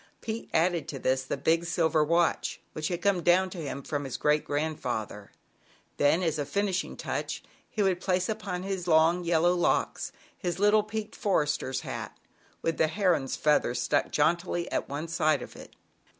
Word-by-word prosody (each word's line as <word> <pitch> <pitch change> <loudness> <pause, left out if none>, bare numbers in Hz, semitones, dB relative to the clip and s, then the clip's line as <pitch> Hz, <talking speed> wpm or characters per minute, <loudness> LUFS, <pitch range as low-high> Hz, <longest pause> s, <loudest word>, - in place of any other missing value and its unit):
Pete 225 0 -5
added 165 -2 +1
to 150 - -5
this 130 0 +1
the 130 - -3
big 165 +1 +2
silver 160 -2 +2
watch 170 +2 +1
which 155 0 -2
had 175 -1 -3
come 200 -3 +2
down 185 +2 +3
to 180 - -7
him 140 -3 -5
from 145 -1 -3
his 135 -3 -4
great 150 0 +2
grandfather; 125 -9 -3 0.7
then, 160 +5 +3
as 160 -3 0
a 145 - -1
finishing 195 +2 -1
touch, - - -3 0.3
he 210 - 0
would 185 -2 +1
place 185 -1 +1
upon 200 -5 -3
his 190 -2 -3
long, 165 +2 +4
yellow 170 +1 +3
locks, 175 -1 0 0.2
his 180 -10 -3
little 210 +2 +5
peaked 215 0 -5
Forester's 150 -8 0
hat, - - -6 0.5
with 165 - 0
the 160 - +3
heron's 160 -5 +1
feather 150 -5 +2
stuck 125 +4 +1
jauntily 170 +3 +1
at - - -2
one 145 +4 -4
side 155 -4 +1
of - - -11
it. - - -12
170 Hz, 175 wpm, -28 LUFS, 150-185 Hz, 0.7 s, little